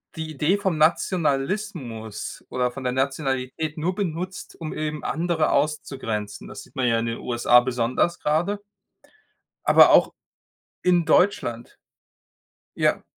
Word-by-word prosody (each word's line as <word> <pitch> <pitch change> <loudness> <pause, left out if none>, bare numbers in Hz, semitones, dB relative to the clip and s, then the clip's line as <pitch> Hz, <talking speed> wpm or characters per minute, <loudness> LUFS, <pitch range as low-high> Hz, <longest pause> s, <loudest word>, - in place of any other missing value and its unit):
die 160 -1 -5
Idee 155 +7 +1
vom 190 -5 -1
Nationalismus 155 - -1
oder 125 -1 0
von 135 +1 -8
der 125 0 -1
Nationalität 135 +3 -2
nur 180 +4 -1
benutzt, 185 -1 -4
um 155 - -4
eben 155 0 -4
andere 165 -1 0
auszugrenzen. 135 -8 -2
Das - - -9
sieht - - -21
man 125 -2 +1
ja 115 -1 +2
in 115 - -2
den 115 - -3
USA 120 0 +4
besonders 125 +6 0
grade 175 +7 0 1.0
aber - - +7
auch - - +5 0.7
in 175 -2 +3
Deutschland. 140 - +1 1.0
Ja. - - +1
150 Hz, 130 wpm, -24 LUFS, 125-170 Hz, 1.0 s, aber